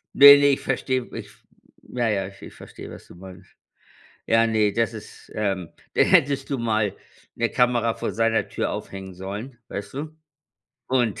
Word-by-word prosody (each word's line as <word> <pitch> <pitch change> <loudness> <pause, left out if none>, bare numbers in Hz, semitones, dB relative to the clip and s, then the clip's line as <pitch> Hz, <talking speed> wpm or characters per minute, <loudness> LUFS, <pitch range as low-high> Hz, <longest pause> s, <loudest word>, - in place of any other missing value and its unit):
Ne, 140 +1 +11
ne, 145 - +4
ich 140 -1 +3
verstehe, 130 -1 -1
ich 105 -2 -8 0.5
ja, 120 -2 -2
ja, 100 -3 -1
ich 100 0 -14
ich - - -11
verstehe, - - -11
was - - -12
du - - -14
meinst. 90 0 -13 0.7
Ja, 115 0 +4
ne, 110 -2 +2
das 115 +2 0
ist, 110 -2 -12
ähm 95 -5 -2 0.2
dann - - +5
hättest 140 0 +3
du 135 - -1
mal 110 -3 0 0.4
'ne 115 0 0
Kamera 120 -2 +2
vor - - -4
seiner 115 0 +1
Tür - - -2
aufhängen 95 -1 -7
sollen, 100 +7 -7
weißt 100 +4 -7
du? 155 +3 -6 0.7
Und 120 -5 +1
115 Hz, 170 wpm, -24 LUFS, 100-130 Hz, 0.7 s, Ne